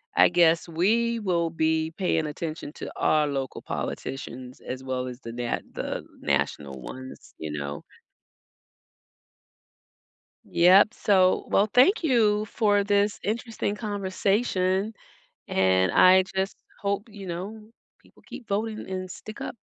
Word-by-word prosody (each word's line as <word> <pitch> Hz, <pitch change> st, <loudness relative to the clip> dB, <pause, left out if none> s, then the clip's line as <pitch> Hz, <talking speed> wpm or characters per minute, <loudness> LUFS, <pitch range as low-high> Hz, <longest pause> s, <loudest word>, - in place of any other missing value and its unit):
I -, -, +6 dB
guess 170 Hz, -1 st, +3 dB
we 225 Hz, +8 st, +1 dB
will 170 Hz, -5 st, 0 dB
be 160 Hz, 0 st, 0 dB
paying 165 Hz, -5 st, 0 dB
attention 155 Hz, -1 st, -5 dB
to -, -, -6 dB
our 150 Hz, -1 st, +2 dB
local 135 Hz, -2 st, -4 dB
politicians 130 Hz, -1 st, -6 dB
as 130 Hz, +1 st, -6 dB
well 130 Hz, -1 st, -2 dB
as 125 Hz, 0 st, -7 dB
the 115 Hz, 0 st, -7 dB
na 120 Hz, 0 st, -2 dB
the -, -, -4 dB, 0.2 s
national 70 Hz, -3 st, -1 dB
ones, 130 Hz, -, -10 dB
you 80 Hz, -1 st, -5 dB
know. 70 Hz, -1 st, -5 dB, 2.6 s
Yup, 190 Hz, +5 st, +5 dB
so 185 Hz, -3 st, +3 dB
well, 205 Hz, +2 st, +3 dB
thank 335 Hz, -, +5 dB
you 215 Hz, -7 st, +3 dB
for 205 Hz, -2 st, +2 dB
this 205 Hz, 0 st, +1 dB
interesting 220 Hz, -1 st, -2 dB
conversation 200 Hz, -1 st, 0 dB, 0.6 s
and 95 Hz, -1 st, +3 dB
I 185 Hz, +1 st, +7 dB
just 190 Hz, +1 st, -1 dB, 0.2 s
hope, 200 Hz, +3 st, -2 dB
you 200 Hz, -2 st, -10 dB
know, 210 Hz, +6 st, -6 dB, 0.3 s
people -, -, -23 dB
keep 240 Hz, -, -10 dB
voting 215 Hz, +2 st, -2 dB
and 185 Hz, -1 st, -4 dB
stick 215 Hz, +4 st, -9 dB
up. -, -, -5 dB
185 Hz, 130 wpm, -26 LUFS, 145-210 Hz, 2.6 s, I